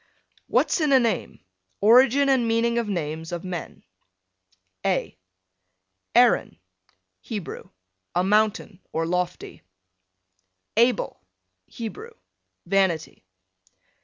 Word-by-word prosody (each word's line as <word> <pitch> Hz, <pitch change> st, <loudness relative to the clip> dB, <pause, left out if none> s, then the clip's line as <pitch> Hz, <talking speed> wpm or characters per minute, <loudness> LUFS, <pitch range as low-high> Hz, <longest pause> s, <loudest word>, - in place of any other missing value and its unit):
WHAT'S -, -, +1 dB
IN 300 Hz, -2 st, +2 dB
A 265 Hz, -, +7 dB
NAME? 235 Hz, -3 st, -2 dB, 0.4 s
ORIGIN 255 Hz, +6 st, +5 dB
AND 260 Hz, -4 st, +2 dB
MEANING 235 Hz, +1 st, +1 dB
OF 230 Hz, -3 st, -3 dB
NAMES 160 Hz, -3 st, -4 dB
OF 175 Hz, -1 st, -4 dB
MEN. 180 Hz, -3 st, -7 dB, 1.0 s
A -, -, -1 dB, 1.0 s
Aaron, -, -, +4 dB, 0.6 s
Hebrew, 205 Hz, -, -7 dB, 0.5 s
a 180 Hz, -, +2 dB
mountain, 210 Hz, -1 st, +1 dB
or 165 Hz, 0 st, -1 dB
lofty. 180 Hz, +1 st, -3 dB, 1.1 s
Abel, 235 Hz, 0 st, +1 dB, 0.5 s
Hebrew, 420 Hz, -, -8 dB, 0.5 s
vanity. 180 Hz, -, 0 dB
210 Hz, 90 wpm, -24 LUFS, 180-235 Hz, 1.1 s, A